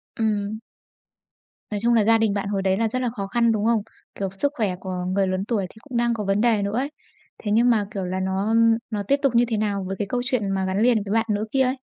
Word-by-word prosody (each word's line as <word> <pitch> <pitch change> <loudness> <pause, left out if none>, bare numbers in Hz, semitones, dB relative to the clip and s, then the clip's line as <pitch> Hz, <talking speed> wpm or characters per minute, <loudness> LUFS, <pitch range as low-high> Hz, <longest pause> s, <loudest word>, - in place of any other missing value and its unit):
Ừm. 215 -1 -1 1.1
Nói 205 - -1
chung 235 0 +4
là 220 -2 +4
gia 225 +1 +5
đình 220 -2 +1
bạn 200 -1 -2
hồi 200 -1 -1
đấy 190 0 +1
là 225 0 +1
rất 255 +4 -2
là 245 - 0
khó 200 -4 -5
khăn, 235 +2 +2
đúng 215 -1 0
không? 230 -2 +3 0.3
Kiểu, 195 -1 -2
sức 285 0 +1
khỏe 205 -6 0
của 185 -1 -4
người 190 0 +1
lớn 185 +1 -1
tuổi 210 -5 -1
thì - - -19
cũng 250 -1 -6
đang 235 0 +2
có 215 -2 -3
vấn 195 +2 +1
đề 225 -4 +3
nữa 200 +3 -1
ấy, 280 +3 -1 0.5
thế 205 - -1
nhưng 235 +3 +4
mà, 215 -3 +3
kiểu 195 -4 -3
là, 185 +1 -2
nó 190 +3 -1 0.4
nó 210 -2 -2
tiếp 280 +7 +2
tục 270 -4 +1
như 240 +1 +5
thế 225 -2 -1
nào 200 -2 -1
với 195 - -3
cái 205 - -1
câu 245 +3 -1
chuyện 235 -5 0
mà 190 -1 0
gắn 190 +3 0
liền 230 -4 +3
với 200 - -6
bạn 225 0 +2
nữ 210 +1 0
kia 270 - +2
ấy? 260 +1 0
215 Hz, 275 wpm, -23 LUFS, 195-235 Hz, 1.1 s, gia